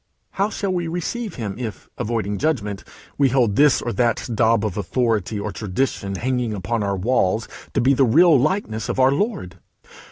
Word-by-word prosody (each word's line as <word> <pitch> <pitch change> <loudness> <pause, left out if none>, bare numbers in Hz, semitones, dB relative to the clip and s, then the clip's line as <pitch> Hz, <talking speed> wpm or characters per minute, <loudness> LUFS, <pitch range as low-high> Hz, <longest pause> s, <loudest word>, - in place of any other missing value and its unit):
How 200 +2 0
shall 200 -3 -2
we 175 -2 -1
receive 180 +6 -4
him 110 -2 -5
if, 115 -4 -6
avoiding 105 -3 -2
judgment, 105 -10 -1 0.4
we 140 -2 +4
hold 120 -5 +2
this 145 +2 +4
or 120 - -2
that 120 -3 0
daub 115 -1 +2
of 105 - -3
authority 110 0 -1
or - - -3
tradition 100 -1 -2
hanging 125 0 -1
upon 110 +4 -2
our 100 -1 -1
walls 110 0 +1 0.3
to - - +3
be 130 +3 +4
the 135 - +3
real 160 +7 +5
likeness 120 - -1
of 120 - -2
our 130 +1 +5
Lord? 140 - -2
120 Hz, 180 wpm, -22 LUFS, 105-140 Hz, 0.4 s, real